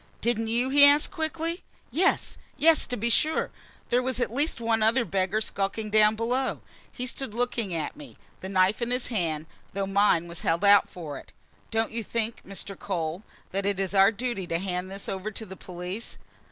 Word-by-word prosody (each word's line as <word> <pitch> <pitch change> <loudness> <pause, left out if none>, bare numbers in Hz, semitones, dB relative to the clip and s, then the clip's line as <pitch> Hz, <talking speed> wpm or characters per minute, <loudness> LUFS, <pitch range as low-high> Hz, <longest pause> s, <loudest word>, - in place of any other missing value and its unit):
"Didn't 225 -1 0
you?" 240 +3 +1
he 285 +1 +7
asked 290 +4 +6
quickly. 330 0 -3 0.3
"Yes, 370 +4 +1 0.2
yes, 325 +1 +5
to 250 - -3
be 235 +3 0
sure! 310 +7 +2 0.4
There 245 +1 +3
was 255 -1 -1
at 245 - -1
least 290 +1 0
one 225 -1 +1
other 230 +3 +3
beggar 195 +2 0
skulking 210 +1 -2
down 215 0 +5
below." 245 +4 -1 0.3
He 250 - -5
stood 255 -3 -4
looking 235 -4 -1
at 155 -2 -3
me, 290 -2 -12 0.2
the 190 - -6
knife 190 +3 +2
in 235 - -1
his 250 0 -1
hand, 165 -9 -1 0.3
though 195 0 -1
mine 195 -3 +3
was 170 0 -7
held 170 +5 +1
out 200 0 +6
for 155 -6 -7
it. - - -16 0.4
"Don't 225 0 0
you 230 0 -3
think, 230 +1 -3
Mr. 195 0 -5
Cole, 170 -2 -3 0.3
that 195 +1 -1
it's 195 -1 -1
our 195 +1 +6
duty 225 -4 -3
to 165 - 0
hand 180 0 -3
this 195 +1 -6
over 195 +2 -3
to 220 +1 -7
the 190 -1 -9
police? 180 +4 -6
215 Hz, 195 wpm, -27 LUFS, 190-245 Hz, 0.4 s, he